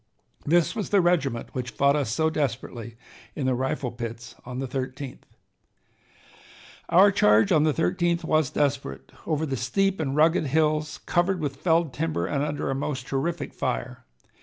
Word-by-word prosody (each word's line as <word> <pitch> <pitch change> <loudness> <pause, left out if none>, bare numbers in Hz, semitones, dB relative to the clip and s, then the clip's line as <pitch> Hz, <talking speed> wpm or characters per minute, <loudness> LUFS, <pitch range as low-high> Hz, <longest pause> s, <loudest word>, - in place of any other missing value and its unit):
This 170 +2 +3
was 210 - -3
the 200 - +4
regiment 150 -10 +1
which 125 -1 -3
fought 140 +4 +2
us 140 -6 -1
so 160 +6 +1
desperately 120 -5 -3 0.4
in 140 - -2
the 130 - +2
rifle 130 0 -2
pits 115 -1 -7
on 125 0 -5
the 135 0 -3
13th. 130 +1 -5 1.6
"Our 195 +4 +6
charge 105 - +4
on 155 -1 +4
the 155 - +3
13th 170 - 0
was 155 -4 +2
desperate, 140 -1 -2 0.2
over 155 -1 0
the 135 -3 -2
steep 190 +11 0
and 140 -3 -1
rugged 160 +1 +3
hills, 155 +1 0
covered 180 +1 +1
with 140 -3 -3
felled 165 -2 +1
timber 145 - -1
and 140 +9 -1
under 145 -2 -2
a - - 0
most 135 -1 -3
terrific 140 +2 -2
fire. 125 0 -3
140 Hz, 160 wpm, -25 LUFS, 130-160 Hz, 1.6 s, Our